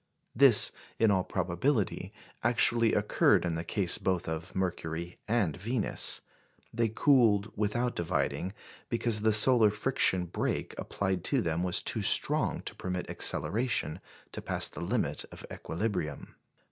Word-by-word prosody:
This, 125 -3 +6 0.3
in 110 -2 +3
all 95 -2 +1
probability, 95 +6 -2 0.3
actually 115 -1 +3
occurred 105 -3 +2
in 85 - -2
the 80 0 -4
case 90 +1 -1
both 95 -2 -2
of 80 +2 -6
Mercury 85 -2 -4
and 105 -9 0
Venus. 110 +4 0 0.5
They 115 -1 0
cooled 110 -4 +2
without 120 +4 -2
dividing, 90 +2 -2 0.4
because 115 -2 0
the 110 0 +2
solar 110 +1 +6
friction 105 -4 0
brake 85 - -3
applied 95 -3 -3
to 135 -4 +2
them 85 0 -2
was 90 -1 +2
too - - 0
strong - - +3
to - - -7
permit 90 -1 -5
acceleration 115 - 0 0.3
to - - -7
pass - - 0
the - - -9
limit - - 0
of - - -10
equilibrium. 85 -6 -5
100 Hz, 135 wpm, -29 LUFS, 90-115 Hz, 0.5 s, This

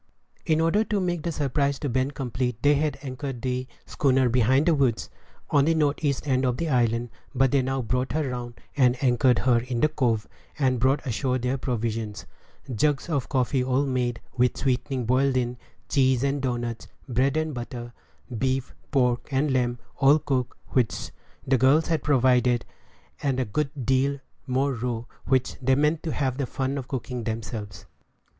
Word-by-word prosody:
In 160 -1 +3
order 165 +7 +3
to 210 -2 0
make 175 -3 -1
the 170 - -2
surprise 140 -1 0
to 145 - -3
Ben 130 +1 0
complete, 125 -3 -3
they 145 0 +6
had 145 -1 0
anchored 130 -2 -5
the 130 0 -2 0.2
schooner 130 -2 +2
behind 130 +4 +3
the 170 - +4
woods, 135 -6 +1 0.4
on 140 -1 +4
the 165 +1 +3
north 150 -1 +1
east 145 0 0
end 130 -1 +2
of 125 -1 +1
the 165 - -2
island; 120 -2 +1 0.2
but 130 0 +3
they 140 - +3
now 130 0 -1
brought 125 +2 -1
her 155 -2 0
round, 120 -3 -5 0.2
and 125 -3 +4
anchored 125 -1 +4
her 125 -2 +3
in 120 0 -3
the 155 - +4
cove, 120 -8 0 0.3
and 130 -4 +1
brought 135 +4 +2
ashore 125 +1 0
their 125 +1 -1
provisions 115 -4 -3 0.5
jugs 145 +7 +1
of 140 -6 -1
coffee 130 -1 +1
all 130 +2 +1
made, 125 -3 -1 0.2
with 125 -1 +3
the - - -9
sweetening 130 -1 0
boiled 130 +2 +2
in; 125 -1 -1 0.3
cheese 130 -3 +2
and 140 0 0
doughnuts, 120 -3 -3 0.2
bread 130 +3 +1
and 155 -1 -1
butter, 120 -1 -6 0.4
beef, 130 +2 -1 0.2
pork, 125 -3 +1
and 135 +1 +1
lamb, 120 -1 +1 0.2
all 140 +2 +6
cooked, 135 -5 -2
which 125 -4 0 0.3
the 130 -1 +2
girls 140 +7 +4
had 160 -3 +1
provided; 125 -3 +3 0.6
and 135 -3 0
a 130 - +1
good 140 +7 -1 0.2
deal 135 +2 +2 0.3
more 135 +2 +1
raw, 120 -1 -3 0.2
which 130 -1 +1
they 130 +1 +3
meant 150 +3 +2
to 165 - -3
have 130 -3 -1
the 135 - -1
fun 135 +2 -2
of 130 - -7
cooking 125 -2 -4
themselves. 110 -3 -5
130 Hz, 180 wpm, -25 LUFS, 125-140 Hz, 0.6 s, they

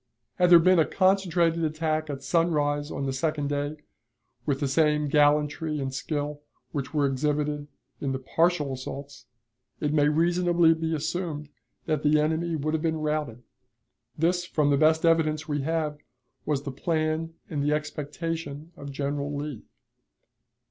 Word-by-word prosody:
Had 180 -1 +4
there 175 - +10
been 185 +1 +5
a 160 - +5
concentrated 180 -3 +2
attack 155 0 -1
at 135 -1 -5
sunrise 145 -2 +1
on 140 - -3
the 135 - -1
second 145 +1 -1
day, 145 +1 -2 0.7
with 140 -2 +1
the 145 - 0
same 150 +1 +2
gallantry 150 +1 +2
and 135 -1 -3
skill 145 +1 -3 0.3
which 135 -3 -4
were 150 -2 +2
exhibited 145 +2 -1 0.3
in 140 - -2
the 135 - -1
partial 150 +1 +1
assaults, 135 0 -8 0.5
it 150 -1 -1
may 145 -1 +4
reasonably 170 +1 +3
be 160 0 -2
assumed 160 -1 -3 0.4
that 155 -3 0
the 150 0 +4
enemy 160 +2 0
would 155 +1 -2
have 160 - 0
been 160 -1 0
routed. 150 -6 -2 0.7
This, 175 +3 +1
from 150 -4 +1
the - - +5
best 160 +2 +4
evidence 155 -2 +2
we 145 -2 -1
have, 155 0 -1 0.5
was 145 -2 0
the 140 - -4
plan 160 +3 -1
and 145 -3 -3
the 145 +1 +1
expectation 150 +1 -4
of 140 0 -8
General 145 +1 -2
Lee. 145 -5 -5
150 Hz, 155 wpm, -27 LUFS, 145-165 Hz, 0.7 s, there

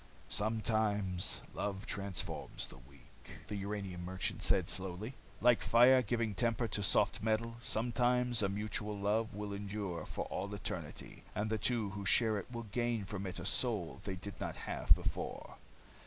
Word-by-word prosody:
"Sometimes 105 -3 0
love 100 0 -3
transforms 100 -4 -3
the - - -11
weak," 70 +2 -16 0.2
the 105 - -2
uranium 100 -3 -4
merchant 95 +1 -2
said - - +3
slowly. 95 +6 -2 0.3
"Like 120 0 +5
fire 125 +2 +7
giving 115 -2 0
temper 115 +2 +1
to 100 - 0
soft 100 +1 +3
metal. 115 +2 0
Sometimes 120 +1 +2
a 100 - +2
mutual 105 +1 -2
love 105 +3 +1
will 105 -1 -4
endure 100 -3 -4
for - - -3
all 100 +2 -3
eternity, 100 - -6
and 110 +1 -1
the 110 - +1
two 110 -2 +1
who 100 0 -5
share 110 +2 +4
it - - -9
will 115 -1 -4
gain 120 -2 0
from 100 0 -4
it 90 - -4
a - - -5
soul 110 -9 0
they 95 - -3
did 100 +1 -7
not - - -2
have - - +5
before. - - -4
105 Hz, 160 wpm, -35 LUFS, 100-115 Hz, 0.3 s, fire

